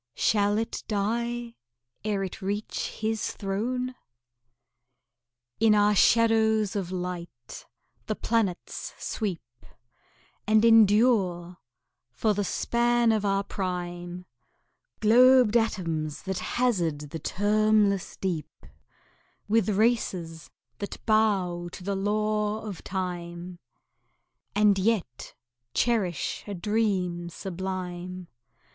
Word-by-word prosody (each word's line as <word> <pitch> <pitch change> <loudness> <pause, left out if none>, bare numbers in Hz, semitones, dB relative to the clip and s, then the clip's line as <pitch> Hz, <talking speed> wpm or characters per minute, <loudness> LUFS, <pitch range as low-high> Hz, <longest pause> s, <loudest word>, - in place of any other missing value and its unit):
Shall 205 -1 +2
it 225 +1 -3
die 235 +3 -2 0.5
ere 205 -2 -1
it 190 +3 -6
reach 205 +3 -3
His 220 0 -1
throne? 245 +6 -2 1.7
In 220 -1 +5
our 205 0 +4
shadows 220 -1 +3
of 190 -3 -3
light 175 -9 -6 0.4
the 215 - -1
planets 215 -6 -2
sweep, 165 - -5 0.8
And 215 +1 +4
endure 205 -6 +4 0.5
for 210 +12 +1
the 205 0 -1
span 235 +3 +2
of 215 -2 +1
our 195 0 +1
prime 180 -2 -5 0.8
Globed 245 +1 +6
atoms 165 -9 -1
that 190 -2 -3
hazard 170 - -1
the 165 - -5
termless 205 +2 +1
deep 175 -5 -2 1.0
With 220 -1 +2
races 190 -7 0 0.3
that 200 - -5
bow 195 -6 +1
to - - -9
the 200 +1 -2
law 210 +2 -1
of 200 -5 -7
Time, 175 -1 -5 1.0
And 205 -1 +4
yet 190 - -1 0.4
cherish 200 - 0
a 205 - -4
dream 185 -4 -1
sublime. 180 0 -5
200 Hz, 95 wpm, -27 LUFS, 180-220 Hz, 1.7 s, Globed